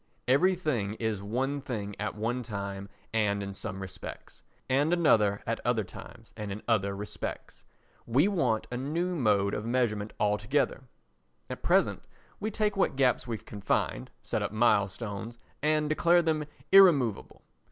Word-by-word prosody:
Everything 140 Hz, -, +2 dB
is 110 Hz, -3 st, -2 dB
one 130 Hz, +7 st, -2 dB
thing 105 Hz, -6 st, -4 dB
at 105 Hz, 0 st, -3 dB
one 115 Hz, +4 st, -1 dB
time 100 Hz, -3 st, -5 dB, 0.2 s
and 100 Hz, -2 st, +1 dB
in 100 Hz, 0 st, -5 dB
some 95 Hz, 0 st, -5 dB
respects, 90 Hz, -1 st, -9 dB, 0.3 s
and 140 Hz, +5 st, +2 dB
another 110 Hz, -, +3 dB
at -, -, -1 dB
other -, -, +1 dB
times -, -, -12 dB
and 105 Hz, -1 st, -5 dB
in 100 Hz, +2 st, -6 dB
other 100 Hz, -4 st, +1 dB
respects. 105 Hz, +1 st, -6 dB, 0.4 s
We 135 Hz, +10 st, +4 dB
want 130 Hz, -, +1 dB
a 125 Hz, -, -2 dB
new 165 Hz, +7 st, -1 dB
mode 105 Hz, -, +2 dB
of 105 Hz, -, -2 dB
measurement 115 Hz, -3 st, 0 dB
altogether; 105 Hz, +8 st, +1 dB, 0.7 s
at -, -, -6 dB
present -, -, +2 dB, 0.4 s
we 215 Hz, -, -2 dB
take 210 Hz, -1 st, 0 dB
what 195 Hz, -, +1 dB
gaps 130 Hz, -2 st, +2 dB
we 115 Hz, -2 st, -2 dB
can 105 Hz, -1 st, -10 dB
find, -, -, 0 dB
set -, -, -2 dB
up -, -, -2 dB
milestones, 110 Hz, 0 st, 0 dB, 0.2 s
and 155 Hz, 0 st, +2 dB
declare 170 Hz, +3 st, +4 dB
them 155 Hz, -2 st, 0 dB, 0.3 s
irremovable. 160 Hz, -, +5 dB
115 Hz, 150 wpm, -29 LUFS, 105-150 Hz, 0.7 s, irremovable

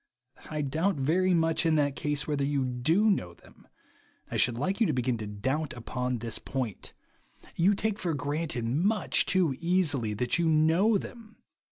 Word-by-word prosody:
I 150 Hz, -1 st, -2 dB
doubt 160 Hz, +7 st, 0 dB
much 165 Hz, +3 st, +2 dB
in 165 Hz, -1 st, +2 dB
that 145 Hz, -2 st, +1 dB
case 150 Hz, 0 st, -1 dB
whether 145 Hz, -2 st, -1 dB
you 140 Hz, -1 st, 0 dB
do 140 Hz, -, +1 dB
know 90 Hz, -, -2 dB
them; -, -, -21 dB, 0.6 s
and -, -, -12 dB
I -, -, -2 dB
should 120 Hz, -1 st, +3 dB
like 190 Hz, -, -2 dB
you 225 Hz, -, +5 dB
to 155 Hz, -, 0 dB
begin 125 Hz, -1 st, 0 dB
to 105 Hz, -, -5 dB
doubt 130 Hz, +9 st, -3 dB
u^^on 125 Hz, 0 st, -3 dB
this 115 Hz, -2 st, -1 dB
point. 125 Hz, -7 st, -5 dB, 0.6 s
You 190 Hz, +4 st, +3 dB
take 215 Hz, +1 st, -2 dB
for 170 Hz, -4 st, -1 dB
granted 145 Hz, -3 st, -2 dB
much 185 Hz, -, +1 dB
too 175 Hz, -7 st, +2 dB
easily 160 Hz, -, +1 dB
that 125 Hz, +8 st, 0 dB
you 170 Hz, -1 st, +2 dB
know 165 Hz, +8 st, +3 dB
them. 225 Hz, +2 st, -10 dB
150 Hz, 175 wpm, -28 LUFS, 125-180 Hz, 0.6 s, you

